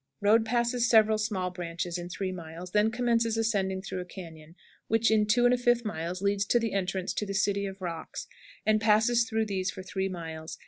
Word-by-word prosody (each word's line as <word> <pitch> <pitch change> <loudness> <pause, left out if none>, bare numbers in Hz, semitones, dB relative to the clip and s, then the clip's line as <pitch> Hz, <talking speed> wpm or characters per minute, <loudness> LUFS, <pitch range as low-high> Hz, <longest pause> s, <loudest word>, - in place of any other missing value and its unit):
Road 215 +2 +4
passes 240 +1 +1
several 220 -1 +5
small 190 -4 -1
branches 175 0 -4
in 175 0 -6
3 185 +1 -3
miles, 170 0 -8
then 210 +2 +3
commences 230 -1 +1
ascending 195 -4 0
through 190 - -4
a - - -3
cañon 165 -3 -11 0.3
which, 225 0 +2
in 215 -1 +3
2 240 +3 +3
1/5 245 -1 +3
miles, 175 -1 -4
leads 200 0 +2
to 220 - +2
the 230 -2 -1
entrance 190 -1 -1
to - - -2
the 200 -1 -4
"City 200 0 +1
of 195 0 -8
Rocks," 165 -2 -5 0.4
and 215 0 +3
passes 225 +3 +3
through 220 -1 0
these 195 -2 -2
for 190 - -7
three 190 0 -2
miles. 160 -3 -7
200 Hz, 195 wpm, -28 LUFS, 180-225 Hz, 0.4 s, several